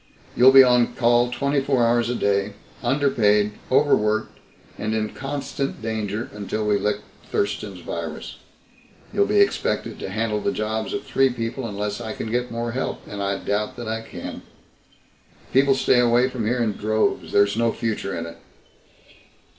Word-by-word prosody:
"You'll 130 +2 +7
be 135 0 +10
on 125 -1 +3
call 120 0 +3
twenty 140 +2 0
four 135 -3 +2
hours 120 0 +2
a 125 - -1
day, 100 -1 0 0.3
underpaid, 120 -6 +2 0.2
overworked, 110 -6 +2 0.4
and 110 +1 -2
in 110 -1 -1
constant 140 +1 -4
danger 110 -1 -3
until 105 +1 -3
we 105 -1 +2
lick 105 +1 -1 0.3
Thurston's 100 -2 -2
virus. 80 -2 -6 0.8
You'll 200 0 +2
be 210 0 +4
expected 200 - 0
to - - -5
handle 105 +1 -1
the - - 0
jobs 110 0 -2
of - - -3
three 135 0 +2
people 120 +1 -4
unless 105 +1 -4
I 110 -2 -4
can 110 - -5
get 125 +1 -1
more 115 0 -3
help 130 +3 -4
and 100 0 -6
I 100 0 -1
doubt 105 +2 -2
that 120 - -7
I 110 0 -2
can. 115 - -8 1.1
People 135 +1 +4
stay 125 - +3
away 120 +1 +4
from 120 -4 -3
here 120 +1 +1
in 110 - +1
droves. 110 +2 -1
There's 100 0 +3
no 115 0 +2
future 110 -5 -3
in 85 - -4
it." 85 0 -9
115 Hz, 165 wpm, -23 LUFS, 105-125 Hz, 1.1 s, be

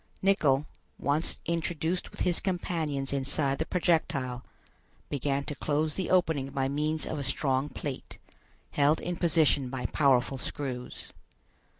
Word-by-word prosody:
Nicholl, 150 -8 +4 0.3
once 145 +4 0
introduced 170 +1 -1
with - - -9
his 175 -2 +2
companions 160 -7 -1
inside 140 0 0
the 160 - -1
projectile, 140 -8 +1 0.7
began 140 0 0
to 150 - -4
close 150 +2 0
the 185 - -2
opening 160 -7 +2
by 135 -1 0
means 150 +3 -1
of 155 - -3
a - - -2
strong 135 +1 0
plate, 145 -3 -6 0.5
held 145 +2 +3
in 175 - -3
position 155 -6 +3
by 130 -1 -4
powerful 135 -2 +3
screws. 130 -4 -5
145 Hz, 130 wpm, -29 LUFS, 135-160 Hz, 0.7 s, Nicholl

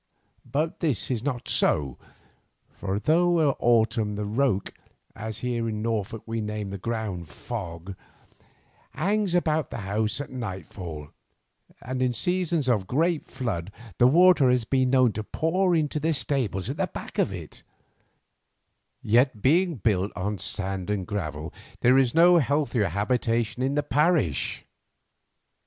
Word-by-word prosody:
But 155 +4 -1
this 140 - -1
is 120 -4 -1
not 125 -2 -3
so, 70 -4 +1 0.7
for 100 0 -3
though 170 +8 +3
in - - -8
autumn 110 -2 +2
the 105 0 -3
roke, 110 -2 0 0.4
as 110 +1 -6
here 120 -2 -1
in 105 -1 -3
Norfolk 110 -1 -2
we 115 0 -3
name 105 -2 -4
ground 100 -5 -4
fog, 90 0 -6 1.0
hangs 195 +4 0
about 155 -4 +1
the - - -6
house 105 +5 -1
at 145 - -6
nightfall, 90 - -6 0.7
and 130 +1 -3
in 125 -1 +2
seasons 175 -1 0
of 105 -7 +1
great 160 +4 0
flood 105 -9 -4 0.3
the 120 - +7
water 170 -2 +6
has 125 -2 +2
been 130 +1 +2
known 130 -2 +4
to 110 - -4
pour 175 - +1
into 155 -1 0
the 160 +1 0
stables 120 -11 -1
at - - -4
the - - 0
back - - -7
of - - +2
it, - - -9 1.4
yet 120 0 +2
being 170 +5 +3
built 100 -3 0
on 100 +1 -3
sand 95 0 -3
and 100 -3 -1
gravel 80 -7 -4 0.3
there 125 +2 +5
is 130 -1 +1
no 175 +1 +7
healthier 140 - +1
habitation 115 +5 0
in 135 +2 0
the 145 - +1
parish. 145 - +1
120 Hz, 145 wpm, -26 LUFS, 105-145 Hz, 1.4 s, the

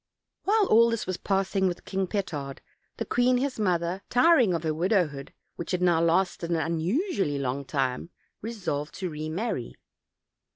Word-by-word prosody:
While 420 +1 +4
all 235 - +5
this 230 -1 -2
was 185 -1 -3
passing 195 0 0
with 175 -1 -4
King 190 -1 -1
Petard, 150 -9 -4 0.4
the - - -3
queen 245 +1 +2
his 260 -1 -2
mother, 180 -2 0
tiring 250 - +5
of 165 - -3
her 160 -1 0
widowhood, 165 -5 0 0.3
which 170 - -6
had 180 -1 -1
now 170 -2 +4
lasted 170 0 +1
an 170 - +1
unusually 170 - 0
long 140 +1 -2
time, 135 +2 -2 0.3
resolved 180 -10 -4
to 185 -3 -4
remarry. 155 - -3
180 Hz, 155 wpm, -27 LUFS, 160-215 Hz, 0.4 s, all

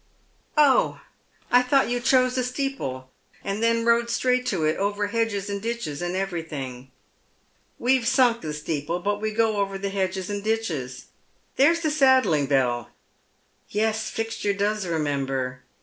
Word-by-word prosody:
" - - -38
Oh, 285 -3 +4 0.5
I 245 - +6
thought 270 +2 +3
you 245 +1 -1
chose 255 0 +3
a 255 - +1
steeple, 250 - -4 0.3
and 200 +2 -3
then 230 0 +2
rode 235 0 +3
straight 250 +1 +1
to 170 -6 0
it, 155 - +1
over 205 +1 0
hedges 225 -3 -1
and 200 -1 -3
ditches, 225 -11 -4
and 175 +1 -2
everj'lhing." 155 -9 -4 0.5
" - - -40
We've 255 -2 +3
sunk 240 -2 +3
the 155 - -4
steeple. 150 +2 -3
But 205 +2 -1
we 215 - 0
go 220 -1 +1
over 195 -1 -1
the 200 +1 -3
hedges 190 -1 -2
and 205 -1 -4
ditches. 180 - -2 0.5
There's 330 +5 +4
the 310 -2 0
saddling 260 - +4
bell. 125 -4 +1 0.8
Yes, 220 +1 0
Fixture 225 -2 -2
does 205 0 -1
remember." 135 -5 -2
205 Hz, 155 wpm, -25 LUFS, 160-235 Hz, 0.8 s, I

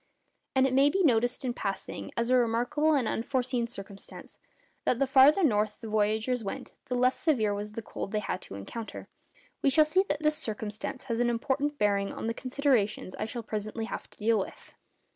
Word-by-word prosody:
And 265 0 +5
it 265 - +1
may 275 +2 +5
be 385 +5 +1
noticed 245 -2 +2
in 245 - 0
passing, 195 -4 -4
as 235 +1 +1
a - - +6
remarkable 245 +6 +2
and 255 -5 +1
unforeseen 245 0 -1
circumstance, 200 -3 -10 0.4
that 245 - +2
the 275 - +2
farther 270 +7 +6
north 210 -6 +2
the 225 - -7
voyagers 220 +3 +1
went 250 +6 -5
the 255 -2 -2
less 255 +1 +3
severe 225 -10 +1
was 205 +1 -5
the 230 - -5
cold 195 - -6
they 215 - 0
had 190 -3 -2
to - - -9
encounter. 215 - -7 0.5
We - - +4
shall 305 +3 +5
see 365 +5 +3
that 295 +1 -1
this 305 0 +3
circumstance 215 +1 -4
has 230 -3 -2
an 240 0 +3
important 275 +5 -1
bearing 200 -3 +1
on - - -5
the 230 - 0
considerations 250 -7 0
I - - -1
shall 235 +1 -5
presently 215 +1 -4
have - - -6
to - - -20
deal 220 0 +2
with. 190 - -7
235 Hz, 200 wpm, -29 LUFS, 215-270 Hz, 0.5 s, a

